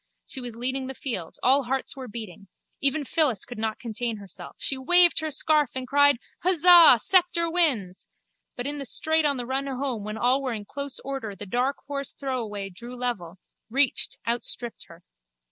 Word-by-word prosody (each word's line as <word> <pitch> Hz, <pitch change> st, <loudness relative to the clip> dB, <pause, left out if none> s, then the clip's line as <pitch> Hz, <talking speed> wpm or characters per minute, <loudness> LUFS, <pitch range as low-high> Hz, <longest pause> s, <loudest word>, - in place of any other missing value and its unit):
She 265 Hz, -, -3 dB
was 240 Hz, -2 st, -6 dB
leading 260 Hz, +2 st, -3 dB
the 265 Hz, -, -7 dB
field. 190 Hz, -, -5 dB
All 270 Hz, +1 st, +3 dB
hearts 265 Hz, +3 st, -2 dB
were 260 Hz, -2 st, -8 dB
beating. 205 Hz, -4 st, -9 dB, 0.3 s
Even 280 Hz, +2 st, +2 dB
Phyllis 280 Hz, -, +1 dB
could 245 Hz, -, -9 dB
not 220 Hz, 0 st, -2 dB
contain 230 Hz, -1 st, -4 dB
herself. 200 Hz, -3 st, -11 dB
She 275 Hz, -, -1 dB
waved 345 Hz, +7 st, +6 dB
her 315 Hz, 0 st, -3 dB
scarf 300 Hz, -1 st, +2 dB
and 260 Hz, -1 st, -4 dB
cried: 285 Hz, -1 st, +4 dB, 0.2 s
Huzzah! 350 Hz, -5 st, +7 dB
Sceptre 355 Hz, -, +2 dB
wins! 250 Hz, -, 0 dB, 0.5 s
But 245 Hz, -, -5 dB
in 290 Hz, +1 st, -4 dB
the 275 Hz, -, -4 dB
straight 315 Hz, +5 st, +1 dB
on 285 Hz, -2 st, +2 dB
the 245 Hz, -, -4 dB
run 265 Hz, +2 st, -2 dB
home 260 Hz, -5 st, -3 dB
when 215 Hz, +1 st, -6 dB
all 250 Hz, +4 st, +1 dB
were 260 Hz, -3 st, -3 dB
in 210 Hz, -2 st, -6 dB
close 280 Hz, +3 st, -5 dB
order 265 Hz, -7 st, -6 dB
the 205 Hz, -, -8 dB
dark 250 Hz, +7 st, -2 dB
horse 280 Hz, -1 st, -5 dB
Throwaway 220 Hz, -8 st, -5 dB
drew 235 Hz, +7 st, -10 dB
level, 220 Hz, -9 st, -3 dB, 0.3 s
reached, 275 Hz, +3 st, +1 dB
outstripped 235 Hz, 0 st, -1 dB
her. 170 Hz, +1 st, -17 dB
260 Hz, 180 wpm, -25 LUFS, 225-285 Hz, 0.5 s, Huzzah